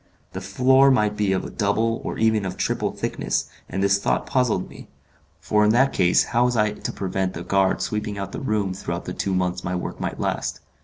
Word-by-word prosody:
The 95 - -5
floor 130 +8 +4
might 105 -5 +2
be 105 -2 +1
of 95 - -3
double 110 +2 +1
or - - -4
even 110 -2 +2
of 95 -1 -4
triple - - -1
thickness, - - -2 0.2
and 95 +2 -2
this 100 0 +3
thought - - 0
puzzled 125 -8 +1
me; - - -13 0.5
for 105 0 +2
in 105 - +4
that 135 +3 +3
case 90 0 +4
how 120 +1 +1
was 125 -1 +1
I 105 -1 +3
to 105 - -5
prevent 95 -1 -2
the 85 - -5
guard 95 0 +1
sweeping 105 -1 -3
out 100 -1 -5
the - - -5
room 105 -7 0
throughout 95 - -5
the - - -4
two 95 -1 -1
months 90 -1 -1
my 90 - -2
work 90 - -5
might - - -4
last. - - -2
100 Hz, 215 wpm, -23 LUFS, 95-115 Hz, 0.5 s, floor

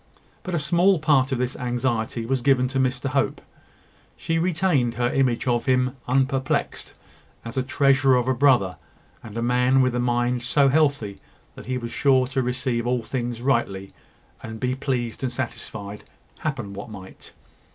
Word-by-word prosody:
But 185 -2 -4
a - - +1
small 175 +6 +3
part 145 -4 +2
of 130 - 0
this 125 +1 -2
anxiety 120 -2 -2
was 130 +1 -1
given 130 -1 +3
to 135 0 -1
Mr 130 +1 0
Hope: 135 -2 0 0.8
she 165 0 -1
retained 165 -8 +1
her 120 +1 0
image 130 -4 +1
of 120 -1 0
him 130 0 +2
unperplexed, 135 +1 0 0.5
as 115 +2 -7
a 130 - +1
treasure 135 0 +3
of 125 0 +1
a 130 - +3
brother, 120 - +3 0.5
and 110 0 -9
a 115 - -1
man 125 +2 +3
with 130 -2 +3
a 125 - -1
mind 120 0 0
so 135 +3 +3
healthy 140 -9 +1 0.3
that - - -12
he 130 0 -1
was 120 -1 -6
sure 130 -2 +3
to 130 0 0
receive 125 -1 -1
all 125 -1 0
things 120 -1 -4
rightly, 100 -7 -1 0.5
and 110 0 -8
be 125 +2 0
pleased 130 -4 -3
and 130 -2 -1
satisfied, 105 -4 -6 0.4
happen 120 -10 -4
what 100 +4 -8
might. 95 -3 -11
125 Hz, 170 wpm, -24 LUFS, 120-135 Hz, 0.8 s, small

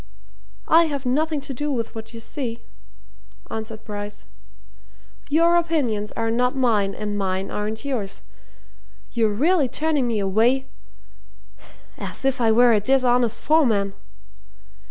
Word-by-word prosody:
"I 335 +1 +6
have 285 -4 -4
nothing 300 +4 0
to 275 - -7
do 295 +4 -2
with 230 -4 -3
what 225 0 -8
you 230 - -9
see," 235 -1 -5 0.9
answered 220 0 -6
Bryce. 205 0 -7 1.0
"Your 335 +3 +4
opinions 270 -12 0
are 225 0 -1
not 250 +3 +1
mine, 215 -7 +1
and 210 -1 -4
mine 190 0 -2
aren't 215 +4 -4
yours. 230 -8 -4 0.9
You're 225 -2 +2
really 290 - +2
turning 300 -2 +1
me 230 -2 0
away 225 +7 +2 1.3
as - - -6
if 270 -2 +1
I 225 -1 +4
were 240 +1 +5
a 215 - +4
dishonest 245 0 +2
foreman! 225 -11 +2
240 Hz, 130 wpm, -23 LUFS, 215-280 Hz, 1.3 s, I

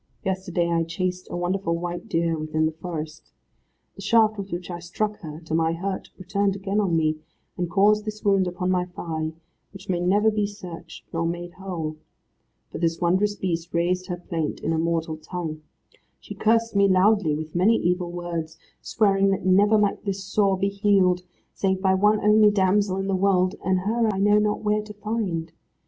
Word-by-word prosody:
Yesterday 185 -2 -1
I 170 -1 +1
chased 180 +2 -3
a - - -4
wonderful 175 -1 -1
white 175 0 -5
deer 165 0 +1
within 155 0 -1
the 155 - +1
forest. 160 -1 -7 0.6
The - - -10
shaft 220 -2 +4
with 200 -1 -7
which 175 +1 -5
I 175 - -5
struck 210 +5 -3
her 155 -4 -8
to 160 -1 -7
my 165 0 +2
hurt, 190 +3 -4
returned 195 +1 0
again 200 +1 -1
on 190 -5 +1
me, 155 -1 +1 0.4
and 175 -2 -2
caused 210 +3 +3
this 215 0 -6
wound 195 -2 +3
upon 180 +1 -2
my 180 -1 +1
thigh, 160 -3 -4 0.4
which 195 - -13
may 180 -2 +1
never 205 +5 +3
be 210 -1 0
searched, 185 -5 -10
nor 165 0 0
made 175 +1 -5
whole. 175 -5 -5 0.7
For - - -6
this 165 0 0
wondrous 185 +4 +2
Beast 170 -3 -3
raised 180 +2 0
her 180 -2 -3
plaint 165 -3 -3
in 165 - -1
a 160 - 0
mortal 165 -1 -1
tongue. 155 -1 -5 0.6
She - - -9
cursed 230 0 +1
me 200 0 +5
loudly, 190 -3 +3
with 155 0 -6
many 190 +6 +4
evil 180 -2 0
words, 170 -2 -5 0.2
swearing 195 -3 +2
that 195 -1 -1
never 205 +3 +5
might 205 -1 +1
this 195 -2 -3
sore 195 -1 +1
be 195 +1 +1
healed, 195 -3 +2 0.3
save 190 -1 0
by 190 0 +2
one 210 +3 +3
only 210 0 +6
damsel 195 -1 +2
in 195 - -2
the 195 - -1
world, 185 -1 +2
and 185 -1 +1
her 225 +3 +1
I 195 - -4
know 205 +2 +4
not 210 0 0
where 210 0 +1
to 210 0 -10
find. 205 -6 -3
185 Hz, 190 wpm, -24 LUFS, 170-200 Hz, 0.7 s, only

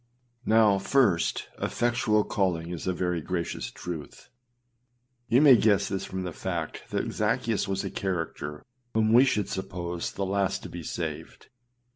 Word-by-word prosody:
1. 110 - +3
Now, 105 -3 +5
first, 100 -6 +2
effectual 120 -3 +1
calling 85 -5 -1
is 85 0 -5
a - - +3
very 90 -2 -1
gracious 85 +1 -3
truth. 90 +7 -8 1.0
You 125 +5 +4
may 140 -4 +9
guess 100 -3 +3
this 95 -1 -2
from 95 0 -4
the 90 -2 -5
fact 85 -4 -4
that - - -2
Zaccheus 110 -3 0
was 95 0 -1
a - - -4
character 80 -5 -3 0.3
whom 110 0 +3
we 125 +3 +8
should 105 -7 +1
suppose 90 -3 -4
the 100 - -2
last 95 0 0
to - - -7
be 85 - -7
saved. 80 -1 -6
95 Hz, 155 wpm, -27 LUFS, 85-105 Hz, 1.0 s, may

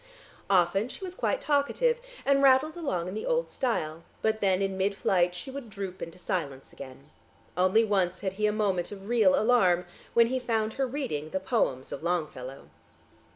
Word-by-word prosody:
Often 195 +4 +3
she 385 - -10
was 365 -2 -5
quite - - -1
talkative, 470 +12 +1 0.2
and 275 0 +4
rattled 275 +4 +4
along 185 - -2
in 185 - -5
the 215 - -4
old - - 0
style, 165 - -2 0.2
but 220 0 +1
then 190 -2 +3
in 195 -1 -1
midflight 190 -2 +1
she 265 +9 -7
would 265 -4 -7
droop 195 -3 -6
into 165 +2 -7
silence 155 -9 -4
again. 140 +2 -11 0.4
Only 185 +5 +4
once 185 -4 0
had 190 -2 -2
he 210 +2 +1
a - - +2
moment 200 -4 0
of 195 -1 -9
real 240 +4 +4
alarm, 190 -7 +3 0.3
when 235 - +7
he 260 +2 -1
found 225 -3 -1
her 270 -1 -1
reading 245 - -3
the 190 - -2
poems 185 - -1
of 140 - -5
Longfellow.... 150 -6 -3
200 Hz, 180 wpm, -28 LUFS, 175-250 Hz, 0.4 s, when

